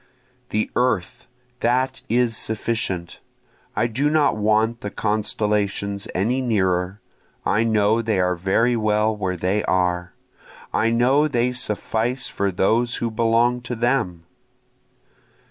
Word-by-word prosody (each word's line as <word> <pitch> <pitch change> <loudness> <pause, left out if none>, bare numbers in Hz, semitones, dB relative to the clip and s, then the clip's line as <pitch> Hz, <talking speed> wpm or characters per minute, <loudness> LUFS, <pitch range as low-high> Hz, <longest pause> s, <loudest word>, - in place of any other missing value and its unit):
The 110 +1 -1
earth, 120 -8 -1 0.3
that 130 +2 0
is 120 0 +2
sufficient, 105 -6 -2 0.6
I - - +1
do 130 +6 0
not 150 -6 +3
want 110 +2 +1
the 105 - -4
constellations 105 -2 -1
any 120 +8 +1
nearer, 95 -5 0 0.5
I 110 - +2
know 110 0 +2
they 110 -4 0
are 90 0 +2
very 100 +7 +1
well 110 0 +1
where 95 -3 -2
they 95 +4 0
are, 90 -1 0 0.6
I 115 - +2
know 130 +6 +3
they 125 -3 +1
suffice 120 +1 -2
for 100 0 -1
those 115 +6 +1
who 115 -1 -2
belong 115 +2 +2
to 120 0 -5
them. 115 -8 0
110 Hz, 125 wpm, -22 LUFS, 100-120 Hz, 0.6 s, not